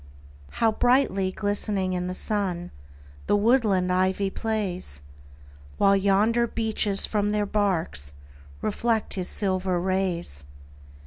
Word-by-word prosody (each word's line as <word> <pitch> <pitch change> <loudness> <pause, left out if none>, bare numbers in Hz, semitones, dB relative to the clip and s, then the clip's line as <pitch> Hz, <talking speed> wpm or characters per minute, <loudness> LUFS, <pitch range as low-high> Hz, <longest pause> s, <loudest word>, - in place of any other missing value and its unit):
How 225 -1 +2
brightly 220 -5 +2
glistening 205 -1 0
in 180 0 -2
the 185 - -4
sun 190 -5 -2 0.6
The - - +3
woodland 205 -5 +2
ivy 190 +1 +1
plays! 190 - -3 0.7
While 200 0 +4
yonder 205 +5 +2
beeches 220 -3 +2
from 205 -1 0
their 210 0 0
barks 180 - -1 0.5
Reflect 225 +1 -1
his 185 -2 -3
silver 185 -2 -1
rays. 180 - -2
195 Hz, 110 wpm, -25 LUFS, 185-215 Hz, 0.7 s, While